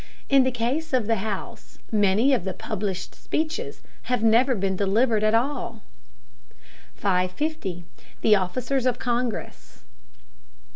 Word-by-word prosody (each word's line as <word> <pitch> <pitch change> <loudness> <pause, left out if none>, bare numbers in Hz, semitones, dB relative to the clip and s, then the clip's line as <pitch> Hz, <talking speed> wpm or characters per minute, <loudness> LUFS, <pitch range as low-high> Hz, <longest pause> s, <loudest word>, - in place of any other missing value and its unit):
In 275 -1 +6
the 260 - +2
case 255 +6 -2
of 250 -4 +2
the 225 +1 +1
House, 200 -1 -6
many 210 +5 +3
of 245 - +1
the 190 -1 -3
published 200 -4 -4
speeches 315 0 -3 0.3
have 250 -3 +1
never 240 +4 +4
been 195 -2 -1
delivered 215 +3 +2
at 215 +1 +4
all. 235 -3 -1 1.1
550. 185 - -1 0.4
THE 215 - +6
OFFICERS 250 +7 0
OF 250 - +1
CONGRESS. 220 - -3
225 Hz, 125 wpm, -25 LUFS, 195-255 Hz, 1.1 s, In